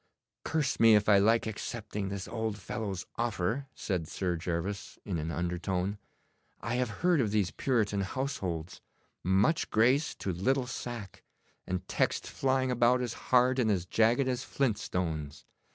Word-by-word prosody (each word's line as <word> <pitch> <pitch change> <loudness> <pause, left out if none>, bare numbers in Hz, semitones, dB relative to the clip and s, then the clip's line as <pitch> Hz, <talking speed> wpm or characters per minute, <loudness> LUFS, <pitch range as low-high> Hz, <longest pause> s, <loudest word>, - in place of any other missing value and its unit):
'Curse 155 -3 0
me 115 -1 +8
if 105 0 +3
I 100 -2 +7
like 115 +3 +4
accepting 105 -2 -4
this 100 -1 -5
old 110 -2 -2
fellow's 95 -1 -4
offer,' 115 +3 -1
said 90 -6 -2
Sir 90 0 -1
Gervas, 85 +4 -3
in 90 -5 -2
an 80 +1 -3
undertone. 90 +3 -2 0.6
'I 120 - -3
have 125 -2 0
heard 170 - +2
of 110 - +1
these 100 -3 +1
Puritan 110 -6 0
households. 95 - -3 0.4
Much 95 - +2
grace 130 +7 +3
to 95 - -3
little 130 +9 +1
sack, 120 -5 -6 0.5
and 90 0 -3
texts - - 0
flying 130 -1 +1
about 125 +1 +4
as 125 - -2 0.2
hard 125 +1 +4
and 115 -3 +2
as 95 -4 +1
jagged 115 +7 +3
as 130 0 -1
flint 130 -5 0
stones. 80 -5 -3
105 Hz, 150 wpm, -30 LUFS, 95-125 Hz, 0.6 s, me